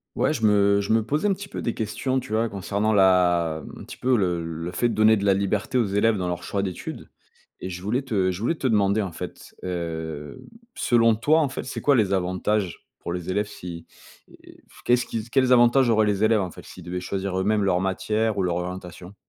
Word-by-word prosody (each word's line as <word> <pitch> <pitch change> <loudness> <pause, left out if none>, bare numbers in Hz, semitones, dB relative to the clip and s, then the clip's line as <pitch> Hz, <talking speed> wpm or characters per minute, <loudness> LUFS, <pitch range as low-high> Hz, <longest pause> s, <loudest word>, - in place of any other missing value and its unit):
Ouais, - - +1
je 115 -8 -1
me 100 -1 +4
je 100 +2 0
me 110 0 +3
posais 150 - 0
un 200 - +3
petit 195 +1 -8
peu - - -6
des 115 - -1
questions, 130 +5 -2
tu 110 - -8
vois? 115 +1 +2
Concernant 100 +1 -1
la 90 -5 +3
m - - -11
un - - -9
petit - - -10
peu 130 0 +2
le 90 -6 0
le 85 +1 -5
fait 95 +7 +1
de 120 - -2
donner 110 0 +5
de 100 - -2
la 100 - +5
liberté 105 +7 0
aux 120 - +2
élèves 105 +3 +2
dans 90 -1 -2
leurs 90 -1 -3
choix 100 - -2
d'études 95 -3 -6 0.5
et 95 - -6
je 90 0 -7
voulais 115 +8 -1
te 100 -8 0
je 90 0 -4
voulais 115 +9 0
te 145 -5 -2
demander 105 -2 +2
en 95 -3 -4
fait, 80 - -9
hem, 80 -4 -5 0.4
selon 115 -2 +3
toi, 150 +9 +3
en 150 -4 +1
fait, 130 - -5
c'est 130 - -6
quoi 145 - +4
les 105 -5 +2
avantages 95 +1 -1
pour - - -5
les 90 +1 -4
élèves, 105 +2 0
si 85 -4 -9 0.4
et - - -18
f - - -18
qu'est-ce 120 0 +2
qu'ils 115 0 -4
quels 130 -2 +3
avantages 120 +1 +5
auraient 110 -1 +4
les 105 0 0
élèves 110 -1 +4
en 90 -2 -4
fait, - - -12
s'ils 90 - -12
devaient 90 +1 -4
choisir 95 0 -3
eux-mêmes 105 +2 +1
leurs 90 -2 +2
matières 105 +3 -1
ou 95 - +1
leur 90 -1 0
orientation? 90 +1 -7
100 Hz, 235 wpm, -24 LUFS, 90-115 Hz, 0.5 s, donner